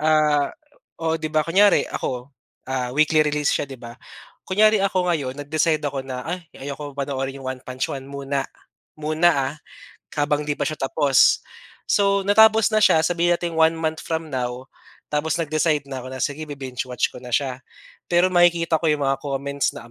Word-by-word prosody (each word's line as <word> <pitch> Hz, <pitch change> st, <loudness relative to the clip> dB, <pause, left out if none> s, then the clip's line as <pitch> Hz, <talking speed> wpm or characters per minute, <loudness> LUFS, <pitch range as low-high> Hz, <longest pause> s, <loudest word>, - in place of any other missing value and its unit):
ah 150 Hz, -2 st, +3 dB, 0.6 s
oo, 160 Hz, 0 st, 0 dB
'di 155 Hz, -, -2 dB
ba 155 Hz, 0 st, +1 dB
kunyari 195 Hz, +4 st, +4 dB
ako, 125 Hz, +2 st, -4 dB, 0.3 s
ah, 130 Hz, -2 st, -2 dB
weekly 155 Hz, 0 st, +4 dB
release 150 Hz, -1 st, +1 dB
siya, 145 Hz, -, -1 dB
'di 135 Hz, -, -8 dB
ba? 115 Hz, -1 st, -10 dB, 0.6 s
Kunyari 215 Hz, +2 st, +4 dB
ako 190 Hz, -2 st, +1 dB
ngayon 135 Hz, -4 st, -3 dB
nag-decide 155 Hz, +1 st, 0 dB
ako 140 Hz, -1 st, -2 dB
na, 130 Hz, -1 st, -6 dB
"Ay 175 Hz, -2 st, -5 dB, 0.2 s
ayaw 140 Hz, 0 st, -5 dB
kong 145 Hz, -1 st, -7 dB
panoorin 135 Hz, -1 st, -3 dB
'yong -, -, -11 dB
One 130 Hz, -, -12 dB
Punch 130 Hz, 0 st, -3 dB
Man 135 Hz, -1 st, -7 dB
muna." 140 Hz, 0 st, -3 dB, 0.6 s
Muna, 155 Hz, +3 st, +3 dB, 0.2 s
ah, -, -, -12 dB, 0.6 s
habang 150 Hz, 0 st, 0 dB
'di 145 Hz, -, +1 dB
pa -, -, -8 dB
siya 155 Hz, -1 st, -3 dB
tapos. 135 Hz, 0 st, +3 dB, 0.5 s
So, 200 Hz, -1 st, +3 dB
natapos 220 Hz, +2 st, +5 dB
na 215 Hz, -, +3 dB
siya, 185 Hz, -6 st, +5 dB
sabihin 175 Hz, +1 st, +2 dB
nating 170 Hz, -1 st, -4 dB
1 160 Hz, 0 st, +5 dB
month 160 Hz, -1 st, -2 dB
from 160 Hz, -1 st, -3 dB
now 125 Hz, -1 st, -4 dB, 0.4 s
tapos 150 Hz, +2 st, 0 dB
nag-decide 155 Hz, -2 st, 0 dB
na 130 Hz, -, -4 dB
ako 125 Hz, -, -8 dB
na, 130 Hz, 0 st, -4 dB
"Sige, 150 Hz, +2 st, -3 dB
bi-binge-watch 130 Hz, -3 st, -3 dB
ko -, -, -10 dB
na 125 Hz, -1 st, -2 dB
siya." 130 Hz, -3 st, -2 dB, 0.5 s
Pero 175 Hz, +1 st, +3 dB
makikita 170 Hz, -2 st, +3 dB
ko 165 Hz, -, -1 dB
'yong 150 Hz, -2 st, +1 dB
mga 135 Hz, 0 st, +1 dB
comments 140 Hz, 0 st, -2 dB
na -, -, -8 dB
150 Hz, 185 wpm, -22 LUFS, 135-165 Hz, 0.6 s, natapos